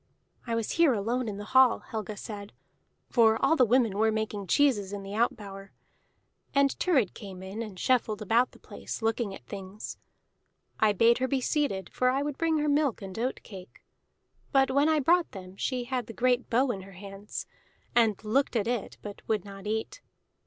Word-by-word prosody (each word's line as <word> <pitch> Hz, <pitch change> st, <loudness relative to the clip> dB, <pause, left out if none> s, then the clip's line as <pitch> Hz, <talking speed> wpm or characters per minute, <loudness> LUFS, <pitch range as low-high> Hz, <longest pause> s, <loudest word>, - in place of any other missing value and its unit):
"I 230 Hz, -, 0 dB
was 230 Hz, -2 st, -1 dB
here 330 Hz, -5 st, +4 dB
alone 230 Hz, +3 st, -1 dB
in 200 Hz, -, -5 dB
the 205 Hz, -, -6 dB
hall," 260 Hz, -2 st, +6 dB
Helga 215 Hz, -1 st, -4 dB
said, 205 Hz, 0 st, -8 dB, 0.6 s
"for 225 Hz, -2 st, +5 dB
all 320 Hz, -, +4 dB
the 260 Hz, -, +5 dB
women 230 Hz, -4 st, +2 dB
were 220 Hz, 0 st, +4 dB
making 215 Hz, -2 st, -3 dB
cheeses 205 Hz, -, +2 dB
in 200 Hz, -1 st, -5 dB
the 195 Hz, +1 st, -7 dB
out 230 Hz, +3 st, +2 dB
bower. 195 Hz, -1 st, -10 dB, 0.8 s
And 280 Hz, 0 st, +4 dB
Thurid 275 Hz, -, +2 dB
came 190 Hz, -3 st, -9 dB
in 195 Hz, +4 st, -6 dB
and 210 Hz, -5 st, -7 dB
shuffled 225 Hz, -3 st, +1 dB
about 230 Hz, +4 st, +2 dB
the -, -, -17 dB
place, -, -, -8 dB
looking 225 Hz, -3 st, 0 dB
at -, -, -14 dB
things. 195 Hz, +1 st, -8 dB, 0.8 s
I 215 Hz, -1 st, +5 dB
bade 230 Hz, +4 st, +4 dB
her 260 Hz, -, +1 dB
be 275 Hz, 0 st, 0 dB
seated, 255 Hz, -, -1 dB
for 255 Hz, -, +2 dB
I 270 Hz, +2 st, +1 dB
would 290 Hz, -1 st, -4 dB
bring 325 Hz, -1 st, +2 dB
her 300 Hz, 0 st, 0 dB
milk 285 Hz, -7 st, +1 dB
and 190 Hz, +2 st, -7 dB
oat 250 Hz, +3 st, -2 dB
cake; 190 Hz, -3 st, -12 dB, 0.7 s
but 270 Hz, -1 st, +4 dB
when 285 Hz, +3 st, +3 dB
I 310 Hz, -1 st, +3 dB
brought 340 Hz, +5 st, +2 dB
them 185 Hz, -2 st, -9 dB
she 250 Hz, +4 st, -2 dB
had 250 Hz, -1 st, -3 dB
the 225 Hz, -, -8 dB
great 250 Hz, +1 st, +1 dB
bow 250 Hz, +3 st, +3 dB
in 195 Hz, -4 st, -5 dB
her 195 Hz, +1 st, -12 dB
hands, 195 Hz, +2 st, -7 dB, 0.5 s
and 225 Hz, -4 st, +4 dB
looked 255 Hz, +5 st, +1 dB
at 220 Hz, -, +1 dB
it 240 Hz, -2 st, -3 dB
but 205 Hz, -1 st, -8 dB
would 215 Hz, -4 st, 0 dB
not 195 Hz, 0 st, -9 dB
eat. 220 Hz, -, -3 dB
225 Hz, 195 wpm, -28 LUFS, 200-260 Hz, 0.8 s, hall